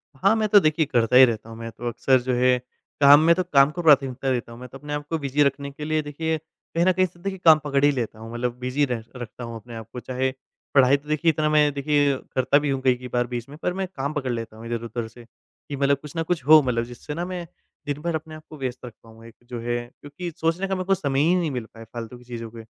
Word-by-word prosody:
हाँ, 195 Hz, +11 st, +3 dB
मैं 220 Hz, -1 st, +1 dB
तो 205 Hz, -, +8 dB
देखिए 155 Hz, -2 st, +2 dB
करता 120 Hz, -3 st, +1 dB
ही 130 Hz, +1 st, +10 dB
रहता 115 Hz, -2 st, -4 dB
हूँ, 115 Hz, -, -9 dB
मैं 115 Hz, 0 st, -7 dB
तो 120 Hz, +1 st, -7 dB
अक्सर 130 Hz, +3 st, +2 dB
जो 125 Hz, +1 st, -1 dB
है, 125 Hz, 0 st, +3 dB, 0.4 s
काम 140 Hz, +1 st, +9 dB
में 165 Hz, +1 st, +6 dB
तो 185 Hz, -, 0 dB
काम 140 Hz, -5 st, +4 dB
को 175 Hz, -, -5 dB
प्राथमिकता 135 Hz, -4 st, +3 dB
देता 120 Hz, -2 st, -2 dB
हूँ, 115 Hz, -, -11 dB
मैं 125 Hz, -, -8 dB
तो 135 Hz, -, -10 dB
अपने 145 Hz, +1 st, -7 dB
आपको 145 Hz, +2 st, -3 dB
बिज़ी 140 Hz, 0 st, +1 dB
रखने 140 Hz, 0 st, -1 dB
के 150 Hz, +2 st, -8 dB
लिए 155 Hz, 0 st, 0 dB
देखिए 160 Hz, +2 st, -2 dB
कहीं 160 Hz, +2 st, -4 dB
न 185 Hz, -, +5 dB
कहीं 185 Hz, +1 st, +3 dB
से 175 Hz, -1 st, -11 dB
देखिए 190 Hz, +1 st, -4 dB
काम 160 Hz, -2 st, +8 dB
पकड़ 140 Hz, -1 st, 0 dB
ही 145 Hz, -, +5 dB
लेता 120 Hz, -5 st, -4 dB
हूँ 115 Hz, +1 st, -9 dB
मतलब 120 Hz, 0 st, -2 dB
बिज़ी 130 Hz, +3 st, 0 dB
रह 120 Hz, -4 st, -3 dB
रखता 120 Hz, -1 st, -8 dB
हूँ 115 Hz, -1 st, -6 dB
अपने 115 Hz, +1 st, -10 dB
आप 115 Hz, -2 st, -8 dB
को। 125 Hz, -, -5 dB
चाहे 130 Hz, +2 st, -2 dB, 0.4 s
पढ़ाई 135 Hz, 0 st, +6 dB
तो 145 Hz, +1 st, -20 dB
देखिए 155 Hz, +2 st, +2 dB
इतना 155 Hz, 0 st, 0 dB
मैं 150 Hz, -1 st, +4 dB
देखिए 145 Hz, 0 st, +2 dB, 0.2 s
करता 130 Hz, +2 st, +3 dB
भी 145 Hz, 0 st, -2 dB
हूँ 135 Hz, -1 st, -1 dB
कई-कई 125 Hz, -1 st, +1 dB
बार 120 Hz, 0 st, +1 dB
बीच 120 Hz, -1 st, -5 dB
में, 145 Hz, -, -11 dB
पर 180 Hz, +2 st, -2 dB
मैं 190 Hz, 0 st, -3 dB
काम 140 Hz, +2 st, -3 dB
पकड़ 135 Hz, -4 st, -2 dB
लेता 115 Hz, -2 st, -5 dB
हूँ 115 Hz, -, -10 dB
इधर-उधर 115 Hz, 0 st, -4 dB
से 120 Hz, +2 st, -15 dB, 0.5 s
कि 145 Hz, -, -3 dB
मतलब 140 Hz, 0 st, +2 dB
कुछ 150 Hz, -1 st, -10 dB
न 165 Hz, -, +1 dB
कुछ 160 Hz, -4 st, -2 dB
हो 155 Hz, +1 st, +8 dB
मतलब 125 Hz, -4 st, 0 dB
जिससे 120 Hz, +5 st, -8 dB
ना 170 Hz, +3 st, -3 dB
मैं 180 Hz, -1 st, -5 dB, 0.4 s
दिन 145 Hz, 0 st, -3 dB
भर 170 Hz, 0 st, -1 dB
अपने 155 Hz, 0 st, -6 dB
आप 155 Hz, -, -12 dB
को 155 Hz, -, -10 dB
व्यस्त 130 Hz, -2 st, -5 dB
रख 120 Hz, -, -9 dB
पाऊँ। 115 Hz, 0 st, -16 dB
एक 115 Hz, 0 st, -14 dB
जो 120 Hz, -, -5 dB
है 120 Hz, +1 st, -1 dB, 0.2 s
क्योंकि 155 Hz, +5 st, -7 dB
सोचने 165 Hz, +4 st, 0 dB
का 190 Hz, -, -1 dB
मेरे 185 Hz, -, -2 dB
को 195 Hz, +1 st, +3 dB
समय 140 Hz, -7 st, -1 dB
ही 170 Hz, +4 st, +3 dB
नहीं 170 Hz, -4 st, 0 dB
मिल 125 Hz, -4 st, -4 dB
पाया 115 Hz, 0 st, -11 dB
फ़ालतू 120 Hz, 0 st, -7 dB
की 120 Hz, -, -17 dB
चीज़ों 120 Hz, -2 st, -7 dB
पे, 115 Hz, 0 st, -10 dB
140 Hz, 275 wpm, -24 LUFS, 120-155 Hz, 0.5 s, ही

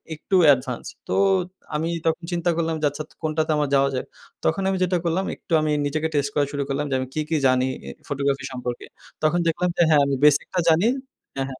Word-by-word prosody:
একটু 170 Hz, +5 st, -2 dB
অ্যাডভান্স। 130 Hz, -3 st, +2 dB, 0.2 s
তো -, -, 0 dB, 0.6 s
আমি 160 Hz, +2 st, -1 dB, 0.2 s
তখন 165 Hz, +1 st, 0 dB
চিন্তা 175 Hz, 0 st, 0 dB
করলাম 165 Hz, -1 st, 0 dB
যে -, -, +2 dB
আচ্ছা 145 Hz, +2 st, -6 dB
তা -, -, -22 dB
কোনটাতে 155 Hz, 0 st, 0 dB
আমার 150 Hz, -2 st, 0 dB
যাওয়া 140 Hz, 0 st, +4 dB
যায়। 130 Hz, -, -2 dB, 0.4 s
তখন 165 Hz, -, +1 dB
আমি 190 Hz, -, 0 dB
যেটা 180 Hz, 0 st, +1 dB
করলাম 175 Hz, +3 st, 0 dB
একটু -, -, -24 dB
আমি 155 Hz, -1 st, 0 dB
নিজেকে 155 Hz, +2 st, -1 dB
টেস্ট 140 Hz, -1 st, +1 dB
করা 145 Hz, -, +3 dB
শুরু 140 Hz, -1 st, -2 dB
করলাম 140 Hz, +2 st, -1 dB
যে 135 Hz, -, 0 dB
আমি 130 Hz, -, -3 dB
কী, 155 Hz, -, -1 dB
কী 165 Hz, -, +1 dB
জানি 130 Hz, 0 st, +2 dB, 0.4 s
ফটোগ্রাফি 140 Hz, -1 st, -1 dB
সম্পর্কে। 125 Hz, -1 st, -5 dB, 0.4 s
তখন 160 Hz, +3 st, +3 dB
দেখলাম 180 Hz, +2 st, +1 dB
যে -, -, +3 dB
হ্যাঁ 150 Hz, -2 st, +6 dB
আমি 140 Hz, 0 st, 0 dB
বেসিকটা 150 Hz, +5 st, +3 dB
জানি 165 Hz, +6 st, +4 dB, 0.5 s
হ্যাঁ, 135 Hz, -1 st, -1 dB
হ্যাঁ। 130 Hz, -1 st, -9 dB
150 Hz, 210 wpm, -23 LUFS, 140-165 Hz, 0.6 s, হ্যাঁ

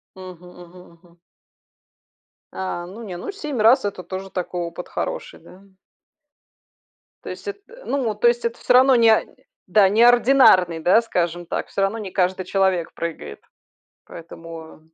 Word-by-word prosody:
Мгм 185 Hz, -2 st, -12 dB
мгм 180 Hz, +1 st, -14 dB, 0.2 s
мгм. 175 Hz, -1 st, -23 dB, 1.4 s
А, 175 Hz, -2 st, -4 dB
ну, 205 Hz, +6 st, -10 dB
не, 190 Hz, -5 st, -7 dB
ну 180 Hz, -, -6 dB
7 300 Hz, -, -5 dB
раз 240 Hz, +2 st, +5 dB
это 190 Hz, -2 st, -5 dB
тоже 190 Hz, +2 st, -7 dB
такой 180 Hz, -1 st, -4 dB
опыт 170 Hz, +1 st, -6 dB
хороший, -, -, -5 dB
да? 180 Hz, +3 st, -17 dB, 1.6 s
То -, -, -7 dB
есть 415 Hz, -, -8 dB
эт 405 Hz, 0 st, -5 dB, 0.3 s
ну, 255 Hz, -6 st, -2 dB
то 220 Hz, +3 st, +3 dB
есть 240 Hz, 0 st, 0 dB
это 235 Hz, -, -2 dB
всё 250 Hz, -, +1 dB
равно 260 Hz, 0 st, +6 dB
не 225 Hz, -2 st, +4 dB, 0.4 s
да, 205 Hz, -3 st, +5 dB
не 215 Hz, +4 st, +2 dB
ординарный, 240 Hz, -9 st, +5 dB
да, 185 Hz, +7 st, +4 dB
скажем 175 Hz, -5 st, -2 dB
так, -, -, -4 dB
всё -, -, -4 dB
равно 200 Hz, +4 st, 0 dB
не 200 Hz, -3 st, -7 dB
каждый 185 Hz, 0 st, -1 dB
человек 190 Hz, -3 st, 0 dB
прыгает. 165 Hz, -, -6 dB, 0.7 s
Поэтому 165 Hz, -1 st, -11 dB
190 Hz, 155 wpm, -21 LUFS, 175-230 Hz, 1.6 s, равно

